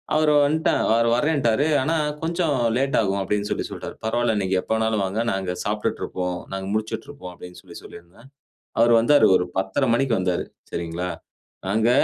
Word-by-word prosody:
அவர் 155 -1 +3
வன்ட்டா, 155 +3 +1 0.2
அவரு 115 +1 +3
வறேன்டாரு. 140 -2 +1 0.2
ஆனா 160 +5 0 0.3
கொஞ்சம் 165 -2 0 0.2
லேட் 135 +1 0
ஆகும் 100 -2 0
அப்டின்னு 105 +1 -1
சொல்லி - - -1
சொல்ட்டார். - - -7
பரவாயில்ல 115 0 +1
நீங்க 95 0 -1
எப்ப - - -9
வேண்ணாலும் 110 -2 0
வாங்க 100 +4 -1
நாங்க 95 -1 -2
சாப்பிட்டுட்டு 105 0 -2
இருக்கோம். 90 -1 -3
நாங்க 95 0 -4
முழிச்சிட்டுருக்கோம் 110 0 -5
அப்டின்னு 90 0 -12
சொல்லி - - -14
சொல்லியிருந்தேன். 90 +9 -14 0.5
அவர் 120 +1 +5
வந்தாரு 145 +6 +5
ஒரு 90 - +2
10.30 95 +8 0
மணிக்கு 125 +1 +1
வந்தாரு. 90 -1 0 0.3
சரிங்களா? 85 +1 -4 0.6
நாங்க, 110 +4 +2
110 Hz, 160 wpm, -23 LUFS, 95-135 Hz, 0.6 s, அவர்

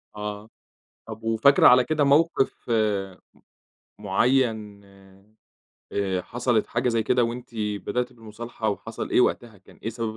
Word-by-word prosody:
آه. 105 +1 -6 0.6
طَب 110 0 -9
وفاكرة 115 +5 +5
على 125 0 +6
كده 150 +1 +1
موقِف 140 -3 +1 1.3
م - - -14
معيّن 110 -6 0 1.1
آآ، 95 -2 -1
حصلِت 120 0 0
حاجة 120 +2 -1
زي 115 -2 +1
كده 125 +2 +2
وأنتِ 120 +2 -6
بدأتِ 110 +4 -2
بالمصالحة 115 0 -6
وحصل 110 +2 -5
إيه - - +4
وقتها 115 -4 -1
كان 95 - -20
إيه - - -3
سبب 115 -1 -4
115 Hz, 130 wpm, -24 LUFS, 105-125 Hz, 1.3 s, على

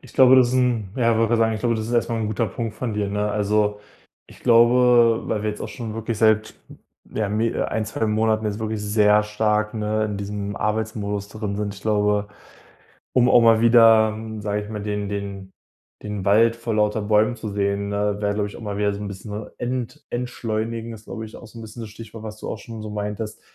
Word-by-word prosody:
Ich - - -16
glaube, 130 0 +7
das 125 -2 +6
ist 125 - -2
'n 125 -5 +1
ja, 115 -2 +3
ich - - +1
wollte 115 0 +2
gerade 120 - +2
sagen, 110 0 +3
ich 110 - -5
glaube, 120 -1 +1
das 110 0 -3
ist 120 - -5
erstmal 115 -1 +1
'n 110 - -1
guter 110 +2 -1
Punkt 110 +2 -4
von 120 -1 -3
dir, 105 -1 -1
ne? 105 +1 -1
Also, 105 0 +1 0.5
ich - - -17
glaube, 120 -1 +5
weil 105 -2 -1
wir 105 - 0
jetzt 105 - -8
auch - - -4
schon 110 -3 -6
wirklich 115 -1 -3
seit, 110 -1 +3
hm, - - -14 0.4
ja 110 -2 0
me 110 +3 +1
äh, - - -2
1, 110 -1 -1
2 110 +1 -2
Monaten 110 0 +1
jetzt 105 +1 -3
wirklich 110 -1 -3
sehr 105 0 +4
stark, 105 0 0
ne, 110 0 0
in 105 -1 -3
diesem 100 0 -4
Arbeitsmodus 105 -2 -2
drin 105 -2 -4
sind 105 -1 -3
ich 100 - -12
glaube, 105 -1 +1 0.9
um 125 0 +4
auch 120 - +6
mal 115 -1 +5
wieder, 115 -2 +6
hm, 110 0 -7
sage 105 0 -1
ich 105 - -9
mal, 105 -2 -5
den 105 -1 -3
den 100 -1 -5 0.5
den 105 -2 -5
Wald 115 +3 +4
vor 115 -1 -4
lauter 105 0 +1
Bäumen 105 +3 +2
zu 110 -2 -6
sehen, 100 0 -1
ne, 100 0 0
wäre 100 -1 0
glaube 105 0 -1
ich 100 - -11
auch - - -11
mal 105 -2 -4
wieder 105 -1 +1
so 100 - -6
'n 105 - -4
bisschen 100 +1 -8
wa 105 +1 -6
ent 125 -1 -4
entschleunigend, 115 -2 -3
ist 110 0 -12
glaube 110 -2 -6
ich 110 - -12
auch 120 - -11
so 115 +1 -12
'n - - -8
bisschen 110 +1 -9
das 110 - -7
Stichwort, 110 0 -11
was 110 0 -7
du - - -6
auch - - -4
schon 115 +1 -9
so 110 - -6
meintest. 105 +1 -5
110 Hz, 240 wpm, -23 LUFS, 105-115 Hz, 0.9 s, glaube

